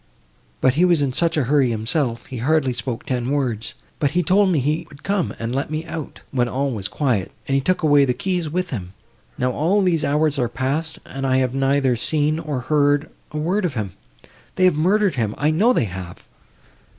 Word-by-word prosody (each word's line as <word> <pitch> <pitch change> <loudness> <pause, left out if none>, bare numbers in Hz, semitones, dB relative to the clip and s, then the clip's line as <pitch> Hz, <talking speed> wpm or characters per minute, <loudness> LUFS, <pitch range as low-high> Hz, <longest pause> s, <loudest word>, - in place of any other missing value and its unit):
But 130 - +4
he 160 +6 +2
was 170 -5 +4
in 135 -2 -1
such 165 +3 +1
a 150 - +3
hurry 135 0 +3
himself, 115 +2 -1
he 130 - -7
hardly 135 +1 +1
spoke 120 -1 -4
ten 125 -3 -2
words, 125 -6 -1 0.2
but 145 - +2
he 180 - +3
told 195 +4 +4
me 175 - +2
he 150 +4 0
would 140 -1 -15
come, 195 -3 -1
and 115 +1 -3
let 135 +2 -1
me 155 +1 -3
out, 160 -3 -7
when 125 -3 +1
all 135 +3 -1
was 100 -5 -3
quiet, 115 -6 -1 0.2
and 135 - -1
he 135 - +3
took 185 +4 0
away 145 -2 +5
the 125 -2 +1
key 180 +4 -1
with 180 +3 -2
him. 95 -7 -5 0.4
Now 125 0 +1
all 185 +9 +2
these 170 -4 +2
hours 150 0 +1
are 120 -2 +1
passed, 140 +6 -2
and 135 0 -4
I 130 0 +3
have 130 -1 +1
neither 135 -1 +2
seen, 150 +5 0
nor 150 -5 -3
heard 145 +2 +2 0.2
a 150 - -6
word 180 +7 0
of 165 -7 -1
him; 105 -4 -3 0.6
they 185 - +3
have 185 - +5
murdered 190 +4 +2
him—I 115 +8 0
know 205 +10 +4
they 185 - +2
have!" 90 -2 -8
145 Hz, 210 wpm, -21 LUFS, 125-160 Hz, 0.6 s, away